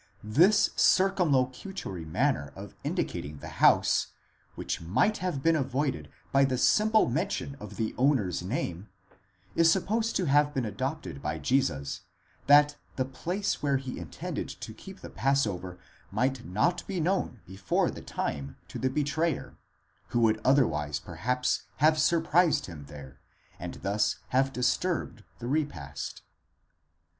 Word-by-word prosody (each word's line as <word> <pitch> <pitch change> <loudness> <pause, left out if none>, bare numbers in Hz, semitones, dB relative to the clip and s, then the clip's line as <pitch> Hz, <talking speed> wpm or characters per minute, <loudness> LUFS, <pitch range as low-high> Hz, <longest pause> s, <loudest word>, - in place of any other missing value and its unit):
This 170 - +4
circumlocutory 145 - +1
manner 70 -2 0
of - - -9
indicating 75 +2 -3
the - - -9
house, - - +5 0.5
which - - -3
might 125 - +2
have 180 -8 -2
been 165 0 +4
avoided 135 0 -1 0.2
by 135 0 +5
the 130 -2 +1
simple 215 - +4
mention 135 +1 -2
of - - -9
the 110 -1 -2
owner's 125 - +2
name, 95 -2 -3 0.6
is 165 -1 +5
sup 190 +1 +1
posed 225 +2 0
to 185 - +1
have 145 0 +3
been 130 -3 0
adopted 130 - -4
by 75 - -2
Jesus, 80 - 0 0.5
that 145 +1 +6 0.2
the 130 - 0
place 175 +10 -2
where 140 -2 +2
he 130 -5 -6
intended 85 -3 -5
to - - -8
keep - - -12
the - - -8
passover 100 -7 0 0.3
might 125 +4 -1
not 110 - +1
be 190 -3 -2
known 170 - -1
before 95 0 0
the - - -9
time 70 0 -4
to - - -6
the 130 - +1
betrayer, 150 +3 -1 0.5
who 120 - 0
would 110 -1 +3
otherwise 75 - +2
perhaps 125 +2 -1
have 155 +2 +4
surprised 165 -1 +3
him 80 -5 -9
there, 70 -2 -11 0.4
and - - -6
thus 105 +2 +1
have 135 +1 +2
disturbed 130 - -1
the 120 - -6
repast. 130 - -3
130 Hz, 140 wpm, -29 LUFS, 105-155 Hz, 0.6 s, that